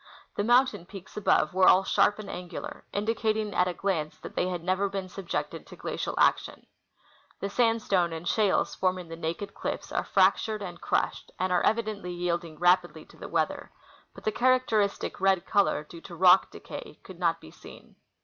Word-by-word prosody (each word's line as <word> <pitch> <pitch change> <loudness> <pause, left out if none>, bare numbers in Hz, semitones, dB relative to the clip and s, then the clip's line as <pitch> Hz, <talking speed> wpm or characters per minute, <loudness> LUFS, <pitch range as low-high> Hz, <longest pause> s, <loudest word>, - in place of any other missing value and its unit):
The 205 - 0
mountain 240 -5 +3
peaks 190 -2 -11
above 180 -6 +2
were 185 0 +4
all 190 - +7
sharp 205 +1 +3
and 215 -2 -8
angular, 180 -1 -7
indicating 215 0 -1
at 180 0 +2
a 180 - -2
glance 165 -6 -2
that - - -10
the}" 180 - 0
had 175 -2 -4
never 190 +2 +1
been 195 -1 -4
subjected 185 -1 -5
to - - -11
glacial - - -4
action. - - +1 0.7
The 200 - -4
sandstone 215 -7 +2
and 165 +1 -6
shales 210 -3 +2
forming 185 -2 -1
the 165 - -6
naked 170 +5 -4
cliff's - - -5
are - - 0
fractured 200 +2 +2
and 175 -3 -8
crushed, - - -1
and 185 0 0
are 180 - +3
evidently 215 -5 -1
yielding 170 -2 -3
rapidly 175 +1 +2
to - - -19
the - - -8
weather; - - -1 0.4
but - - -12
the 215 - +1
char 255 +3 +4
acteristic 215 -5 -1
red 190 -2 +2
color 200 -6 +2
due 165 +2 -12
to 175 - -10
rock 180 +2 +6
decay - - -10
could 185 -2 -12
not 170 -2 +1
be 80 - -14
seen. - - -15
190 Hz, 185 wpm, -28 LUFS, 175-210 Hz, 0.7 s, all